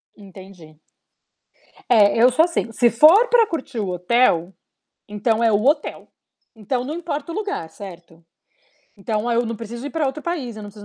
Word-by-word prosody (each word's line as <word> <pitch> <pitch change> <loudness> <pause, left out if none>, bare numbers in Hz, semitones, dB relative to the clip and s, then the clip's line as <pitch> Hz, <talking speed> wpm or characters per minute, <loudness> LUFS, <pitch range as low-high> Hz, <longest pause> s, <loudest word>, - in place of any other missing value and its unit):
Entendi. 185 -6 -15 1.1
É, 205 -3 +5
eu 250 +1 +6
sou, 315 +7 +4
assim, 335 -9 -3
se 240 +1 +2
for 330 - +6
pra 465 -3 +4
curtir 275 - -5
o 200 - -2
hotel, 180 -1 +1 0.5
então, 215 +2 -1
é 230 - +3
o 210 +2 +1
hotel, 295 +3 -1 0.4
então, 245 +3 -3
não 290 +4 -5
importa 325 -2 -5
o - - -6
lugar, 405 - -4
certo? 170 -3 -13 0.7
Então, 215 +3 -3
eu 235 +1 +1
não 230 -1 -4
preciso 235 +4 -8
ir - - -7
pra 315 -2 -2
outro 275 +3 -4
país, 280 -10 -4
eu 215 - -9
não 205 - -9
preciso 205 0 -14
230 Hz, 175 wpm, -21 LUFS, 205-285 Hz, 1.1 s, eu